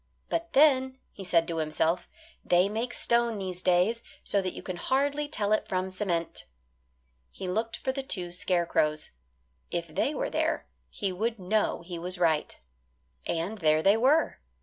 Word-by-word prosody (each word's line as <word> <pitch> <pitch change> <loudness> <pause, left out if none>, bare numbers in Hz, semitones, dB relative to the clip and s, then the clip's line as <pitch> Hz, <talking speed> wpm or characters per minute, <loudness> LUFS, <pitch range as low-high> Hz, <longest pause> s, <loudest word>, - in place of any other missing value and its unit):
"But 335 0 -2
then," 265 -2 +4
he 195 - -9
said 170 -3 +2
to 165 - -3
himself, 160 +2 0 0.3
"they 180 +2 +4
make 225 +4 -2
stone 235 -2 +1
these 185 -2 -4
days 185 +6 +2 0.2
so 200 - +2
that 185 -1 -3
you - - -8
can 185 -2 -5
hardly 285 +7 0
tell 210 -8 -1
it 215 - +1
from 185 0 -1
cement." 180 -4 -2 0.8
He 190 - -7
looked 220 +5 -1
for 260 - -1
the 275 +1 -3
two 185 -10 -4
scarecrows. 170 -4 0 0.6
If 170 -1 -3
they 285 - 0
were - - -2
there - - 0 0.2
he 200 -3 -2
would 225 +5 -1
know 195 -1 0
he 170 -1 -6
was 180 +2 -4
right. 160 -3 +1 0.7
And 175 +6 -2
there 155 -2 +3
they 200 +2 +6
were. 270 +8 +3
190 Hz, 165 wpm, -28 LUFS, 175-235 Hz, 0.8 s, they